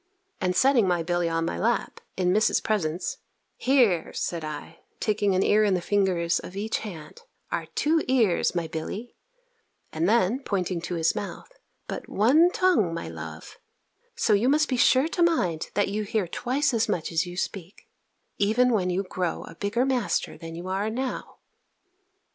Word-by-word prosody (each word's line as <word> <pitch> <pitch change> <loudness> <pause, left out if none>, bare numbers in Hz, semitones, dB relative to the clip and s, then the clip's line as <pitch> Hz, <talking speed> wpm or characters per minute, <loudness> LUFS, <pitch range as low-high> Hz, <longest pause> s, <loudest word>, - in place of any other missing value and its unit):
And 180 -1 0
setting 255 -1 +4
my 175 -2 +1
Billy 175 0 0
on 165 0 0
my 85 - -3
lap, - - 0 0.2
in 180 -1 +2
Miss's 215 +2 +3
presence 180 -5 -2 0.4
"Here," 240 -11 +2
said 170 -2 -3
I, 155 +2 -7 0.2
taking 205 -3 +1
an 185 - +3
ear 215 +1 +4
in 200 -3 +3
the - - 0
fingers 175 -3 +1
of 180 - -10
each 210 +3 -2
hand, 205 - -9 0.3
"are - - -2
two 320 +2 +2
ears, 225 -10 +2
my 170 -1 0
Billy," 180 +9 -6 0.8
and 160 +4 +1
then, 230 +2 +3
pointing 185 -8 -2
to 175 +1 -4
his 165 -1 +2
mouth, 205 - -6 0.4
"but - - -6
one 280 - +5
tongue, 350 - +2
my 170 - -5
love; 80 -1 -9 0.6
so 215 - +2
you 215 +5 +3
must 305 +1 +3
be 260 - +1
sure 260 +3 +4
to 350 - -2
mind 185 - +1
that 205 -1 +2
you 210 +2 -2
hear 210 -2 -1
twice 265 - 0
as 225 -1 +1
much 160 - -1
as 165 +2 0
you 175 0 -8
speak, 190 -1 -5 0.5
even 225 +5 +3
when 185 -4 +1
you 185 +2 0
grow 180 -2 -3
a - - -10
bigger 205 +8 0
master 255 -5 0
than 165 0 -9
you 175 +2 -7
are 195 +3 -1
now." 255 +3 -4
195 Hz, 175 wpm, -26 LUFS, 170-235 Hz, 0.8 s, one